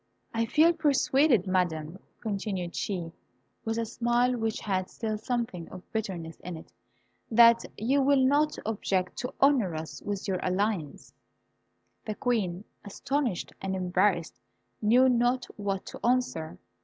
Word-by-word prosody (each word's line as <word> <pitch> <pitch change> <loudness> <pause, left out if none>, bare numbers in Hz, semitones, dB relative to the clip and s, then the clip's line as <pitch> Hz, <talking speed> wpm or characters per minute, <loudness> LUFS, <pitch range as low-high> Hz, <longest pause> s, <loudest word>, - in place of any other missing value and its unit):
I 230 0 0
feel 320 +7 +5
persuaded, 280 - +3
Madam," 175 -2 -1 0.2
continued 195 -5 -3
she, 175 -5 -3 0.5
with 225 0 -2
a 230 - 0
smile 240 +2 +1
which 225 -2 -2
had 185 -3 -1
still 220 -2 -3
something 220 -6 -3
of 185 -1 -10
bitterness 180 -7 -4
in 180 -2 -7
it, 160 - -14 0.6
"that 235 0 +6
you 265 +6 +2
will 270 -1 +4
not 295 +3 +2
object 195 -4 -1
to 250 - -3
honour 255 - +3
us 155 -2 -6
with 205 -1 -4
your 185 -2 0
alliance." 185 -5 -2 0.9
The 215 - -4
Queen, 205 -7 -1 0.2
astonished 245 0 -2
and 195 0 -2
embarrassed, 180 -5 +1 0.4
knew 245 +5 +5
not 245 0 +2
what 200 -2 -3
to - - -10
answer. 210 -10 0
215 Hz, 135 wpm, -28 LUFS, 185-245 Hz, 0.9 s, that